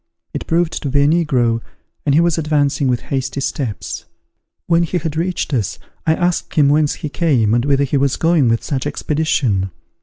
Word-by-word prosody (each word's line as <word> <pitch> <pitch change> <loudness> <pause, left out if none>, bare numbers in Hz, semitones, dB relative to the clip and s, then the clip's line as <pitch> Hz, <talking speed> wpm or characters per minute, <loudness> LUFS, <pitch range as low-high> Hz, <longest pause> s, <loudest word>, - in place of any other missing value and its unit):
It - - -5
proved 165 0 0
to 145 - -2
be 140 +1 +3
a - - +4
negro, 130 -8 +2 0.5
and 140 - +4
he 160 - +5
was 170 -1 +1
advancing 145 -2 +1
with 125 -2 +1
hasty 135 +1 -2
steps. 130 -5 -4 0.6
When 170 0 +3
he 170 +2 0
had 160 -3 -3
reached 170 -2 -2
us, 110 -8 -1 0.3
I 160 - +4
asked 175 0 -1
him 145 -3 +5
whence 150 0 +2
he - - 0
came, 130 -10 +2
and 120 0 +2
whither 140 -1 +2
he 140 +1 0
was 140 0 +1
going 165 -6 +3
with 115 0 +1
such 135 -4 -2
expedition. 130 -11 0
145 Hz, 190 wpm, -18 LUFS, 130-160 Hz, 0.6 s, he